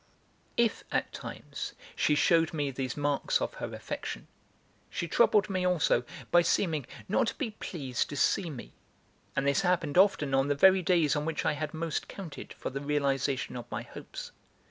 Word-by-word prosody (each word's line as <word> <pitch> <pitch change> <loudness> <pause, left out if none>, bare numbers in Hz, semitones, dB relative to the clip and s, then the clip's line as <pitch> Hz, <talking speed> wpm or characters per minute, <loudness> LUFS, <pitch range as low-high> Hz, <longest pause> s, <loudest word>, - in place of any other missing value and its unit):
If, 235 -2 +2
at - - 0
times, - - -6 0.2
she 150 - +3
shewed 165 +1 +3
me 145 -2 0
these 130 -1 -3
marks 145 -1 +1
of - - -2
her - - -3
affection, - - -5 0.6
she 170 - -3
troubled 210 +3 +4
me 185 -2 -1
also 165 -9 +2 0.3
by 175 - +7
seeming 160 -6 +1 0.2
not 215 - +2
to - - -2
be 240 -6 -3
pleased 140 - -3
to 145 - -5
see 170 +5 +2
me, 135 -6 -8 0.6
and 140 - +1
this 140 +7 +3
happened 175 -4 +2
often 170 -8 +4
on 135 +1 +3
the 145 - +1
very 190 +5 +6
days 165 -5 +3
on 150 - 0
which 160 0 -2
I - - +3
had 150 +1 -4
most 160 -1 -2
counted 180 -7 -8
for - - -5
the 140 +1 -4
realisation 140 -3 0
of 120 -2 -7
my - - -4
hopes. - - -9
150 Hz, 180 wpm, -30 LUFS, 140-180 Hz, 0.6 s, by